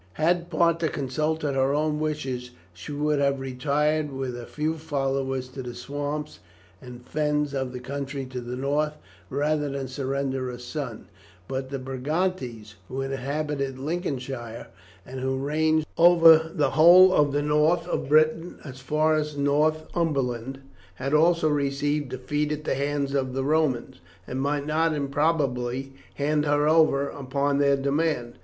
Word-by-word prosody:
Had 170 - +1
Parta 170 -1 +2
consulted 150 +2 -1
her 135 +1 +2
own 150 0 0
wishes 135 -5 -3 0.2
she 90 +10 -9
would 150 0 0
have 140 -1 +1
retired 145 +3 0
with 135 -2 -4
a 120 -1 -8
few 155 +1 -2
followers 135 -3 -2
to 130 +1 -7
the 120 -1 -7
swamps 145 +4 -4 0.4
and 125 -1 -11
fens 150 -1 0
of 130 -2 -2
the 125 - -6
country 140 +1 -5
to 130 -1 -6
the 120 +1 -5
north 145 +3 0 0.4
rather 150 +2 0
than 135 -1 -4
surrender 135 0 -2
her 125 - -6
son, 125 -1 -6 0.4
but 130 0 -4
the 140 - -3
Brigantes, 130 - -3
who 130 +1 -4
inhabited 135 0 -3
Lincolnshire, 130 - -4 0.4
and 130 +1 -7
who 130 +1 -1
ranged 155 +3 +1
over 165 -2 +7
the 145 -4 +1
whole 180 +4 +8
of 145 -4 +3
the 145 +1 0
north 150 +3 +2
of 155 - -2
Britain 155 +3 +3
as 130 -3 -9
far 155 +4 +1
as 150 -1 -1
Northumberland, 140 -3 0 0.3
had 135 +3 -3
also 165 +1 +4
received 145 -1 0
a 130 - -4
defeat 150 +4 -1
at 150 0 -3
the - - 0
hands 140 0 -1
of 130 -2 -1
the 135 - 0
Romans, 140 - 0 0.3
and 130 +6 -4
might 145 +1 -1
not 160 +1 +1
improbably 135 -3 -1 0.2
hand 150 +1 0
her 145 +1 +2
over 155 -3 +4
upon 140 +1 -1
their 140 -1 +4
demand. 140 -3 -1
140 Hz, 150 wpm, -25 LUFS, 130-155 Hz, 0.4 s, whole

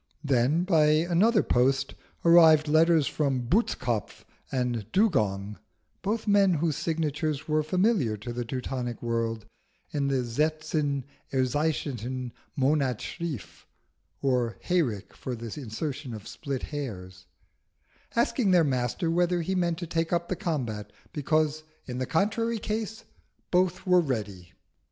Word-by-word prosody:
Then, 140 +4 +2
by 165 -5 +4
another 175 +8 +3
post, 130 +2 +2 0.3
arrived 160 -3 +7
letters 160 0 +4
from 135 -5 0
Butzkopf 120 - 0 0.3
and 120 -4 -2
Dugong, 105 - +1 0.4
both 215 +3 -2
men 200 -3 +5
whose 155 -1 0
signatures 155 -2 -2
were 155 0 +2
familiar 175 - +1
to 110 +4 -6
the 120 +1 -2
Teutonic 125 0 -4
world 115 -2 -1 0.5
in 140 -2 0
the 135 -2 0
Selten 150 +1 0 0.3
erscheinende 130 -2 -1 0.2
Monat 135 -3 +2
schrift 155 - -6 0.6
or 125 -4 +1
Hayrick 125 - 0
for 125 - -5
the 115 -1 -7
insertion 130 +2 -4
of 105 -1 -10
Split 135 -3 -5
Hairs, 95 -11 -6 0.9
asking 235 -2 +2
their 180 -2 +5
Master 130 +4 0
whether 175 0 +2
he 190 - -1
meant 175 -3 +1
to 175 - -4
take 165 0 -1
up 175 0 0
the 185 - 0
combat, 120 - -3 0.2
because, 155 0 +1 0.2
in 125 -1 -5
the 130 - -2
contrary 225 +6 +1
case, 220 +1 -4 0.5
both 180 0 +1
were 180 -1 +5
ready. 105 - -4
150 Hz, 130 wpm, -27 LUFS, 120-170 Hz, 0.9 s, arrived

